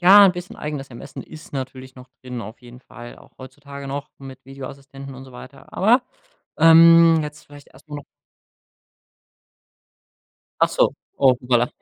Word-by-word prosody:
Ja, 195 Hz, +3 st, +8 dB
'n 190 Hz, -, +4 dB
bisschen 180 Hz, 0 st, -9 dB
eigenes 145 Hz, -2 st, -6 dB
Ermessen 120 Hz, -, -10 dB
ist 155 Hz, -1 st, -14 dB
natürlich 130 Hz, -1 st, -7 dB
noch 125 Hz, 0 st, -14 dB
drin 125 Hz, -2 st, -7 dB
auf 110 Hz, +1 st, -10 dB
jeden 125 Hz, 0 st, -14 dB
Fall, 120 Hz, -2 st, -12 dB
auch -, -, -21 dB
heutzutage 140 Hz, +2 st, -11 dB
noch 140 Hz, +1 st, -5 dB
mit 135 Hz, -1 st, -12 dB
Videoassistenten 135 Hz, 0 st, -10 dB
und 130 Hz, +1 st, -11 dB
so 130 Hz, -, -15 dB
weiter 135 Hz, +2 st, -14 dB
aber, 235 Hz, +6 st, +3 dB, 0.6 s
ähm, 165 Hz, 0 st, +7 dB
jetzt 150 Hz, 0 st, -9 dB
vielleicht 145 Hz, 0 st, -15 dB
erstmal 145 Hz, +2 st, -11 dB
noch 145 Hz, -, -11 dB, 2.6 s
Achso, -, -, +2 dB, 0.2 s
oh 135 Hz, -2 st, +5 dB
hoppala, 120 Hz, -1 st, +1 dB
135 Hz, 145 wpm, -21 LUFS, 130-155 Hz, 2.6 s, Ja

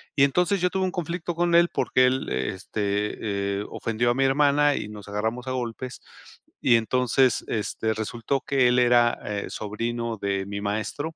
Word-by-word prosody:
Y 140 Hz, -, +4 dB
entonces 180 Hz, +7 st, +1 dB
yo 180 Hz, -, +3 dB
tuve 190 Hz, 0 st, 0 dB
un 185 Hz, -, -1 dB
conflicto 175 Hz, 0 st, -3 dB
con 175 Hz, 0 st, +2 dB
él, 170 Hz, 0 st, +5 dB
porque 130 Hz, -, +3 dB
él, 130 Hz, +1 st, -1 dB
este, 100 Hz, -, -2 dB
eh, -, -, -6 dB
ofendió 115 Hz, +1 st, 0 dB
a -, -, -1 dB
mi 135 Hz, -, +2 dB
hermana 145 Hz, +1 st, +3 dB
y -, -, -4 dB
nos 105 Hz, -1 st, -10 dB
agarramos 110 Hz, +5 st, -3 dB
a -, -, -2 dB
golpes. 125 Hz, 0 st, -5 dB, 0.6 s
Y 120 Hz, -, +5 dB
entonces, 125 Hz, +2 st, +2 dB
este, 110 Hz, 0 st, -2 dB
resultó 115 Hz, +5 st, -2 dB
que 135 Hz, -3 st, +2 dB
él 125 Hz, -, +2 dB
era 120 Hz, -1 st, +4 dB, 0.3 s
sobrino 115 Hz, +2 st, -3 dB
de 100 Hz, -1 st, -2 dB
mi 100 Hz, +1 st, -5 dB
maestro 110 Hz, +10 st, -3 dB
120 Hz, 170 wpm, -25 LUFS, 105-140 Hz, 0.6 s, él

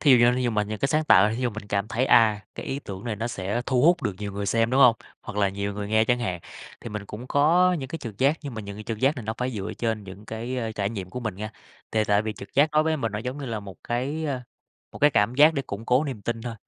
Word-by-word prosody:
Thí 145 Hz, -, +4 dB
dụ 130 Hz, -, +9 dB
như 120 Hz, +1 st, +5 dB
thí 130 Hz, -, 0 dB
dụ 120 Hz, -, +1 dB
mà 105 Hz, -2 st, +1 dB
những 105 Hz, 0 st, -5 dB
cái 140 Hz, -, 0 dB
sáng 155 Hz, +1 st, +1 dB
tạo, 105 Hz, -5 st, +6 dB
thí 115 Hz, +4 st, -3 dB
dụ 125 Hz, -, +1 dB
mình 110 Hz, -1 st, -8 dB
cảm 100 Hz, +1 st, -1 dB
thấy, 120 Hz, +4 st, 0 dB
à, 110 Hz, -2 st, +5 dB
cái -, -, -7 dB
ý 135 Hz, -, -2 dB
tưởng 100 Hz, -6 st, -8 dB
này 115 Hz, -3 st, -3 dB
nó 115 Hz, +3 st, -2 dB
sẽ 105 Hz, +2 st, -2 dB
thu 130 Hz, -1 st, +2 dB
hút 170 Hz, 0 st, +4 dB
được 105 Hz, -6 st, 0 dB
nhiều 100 Hz, -1 st, -5 dB
người 100 Hz, 0 st, -3 dB
xem, 115 Hz, +3 st, +2 dB
đúng 135 Hz, -, +3 dB
hông? 120 Hz, -4 st, +7 dB, 0.3 s
Hoặc -, -, -8 dB
là 100 Hz, -1 st, +3 dB
nhiều 100 Hz, +1 st, -3 dB
người 100 Hz, 0 st, -4 dB
nghe 110 Hz, +1 st, +3 dB
chẳng 120 Hz, +1 st, +2 dB
hạn, 90 Hz, -8 st, -3 dB, 0.4 s
thì -, -, -7 dB
mình 105 Hz, -2 st, -5 dB
cũng 115 Hz, +4 st, -8 dB
có 170 Hz, +7 st, +4 dB
những 130 Hz, -, -5 dB
cái 165 Hz, -, -5 dB
trực 115 Hz, -7 st, -8 dB
giác, 140 Hz, +4 st, +3 dB
nhưng 140 Hz, -5 st, -6 dB
mà 110 Hz, -, -4 dB
những 100 Hz, 0 st, -8 dB
cái 105 Hz, -, -8 dB
trực 110 Hz, -2 st, -4 dB
giác 135 Hz, +5 st, +2 dB
này 125 Hz, -, -5 dB
nó 110 Hz, +1 st, -3 dB
phải 125 Hz, +1 st, -1 dB
dựa 105 Hz, -2 st, -4 dB
trên 110 Hz, -3 st, -1 dB
những 100 Hz, +2 st, -11 dB
cái, 120 Hz, +3 st, -4 dB
a, 115 Hz, -2 st, -3 dB
trải 100 Hz, -1 st, -2 dB
nghiệm 95 Hz, -5 st, -6 dB
của 125 Hz, -, -5 dB
mình 110 Hz, -5 st, -3 dB
nha. 105 Hz, +2 st, -5 dB, 0.4 s
Thề 110 Hz, -1 st, +2 dB
tại 105 Hz, 0 st, +3 dB
vì 110 Hz, 0 st, -3 dB
trực 100 Hz, -, -12 dB
giác 145 Hz, +2 st, +4 dB
đối 155 Hz, 0 st, +4 dB
với 160 Hz, 0 st, +1 dB
mình 115 Hz, -6 st, -2 dB
nó 105 Hz, -, -2 dB
giống 125 Hz, +5 st, -5 dB
như 140 Hz, -, -5 dB
là 110 Hz, -3 st, -3 dB
một 95 Hz, -4 st, -10 dB
cái, 135 Hz, +7 st, -2 dB
ơ, 135 Hz, -4 st, -2 dB, 0.5 s
một -, -, -9 dB
cái 145 Hz, +1 st, +5 dB
cảm 105 Hz, +1 st, +2 dB
giác 155 Hz, +3 st, +6 dB
để 140 Hz, -, -1 dB
củng 105 Hz, -1 st, -7 dB
cố 130 Hz, +5 st, +3 dB
niềm 130 Hz, -8 st, -5 dB
tin 115 Hz, 0 st, -3 dB
thôi, 120 Hz, -1 st, -5 dB
115 Hz, 320 wpm, -25 LUFS, 105-130 Hz, 0.5 s, dụ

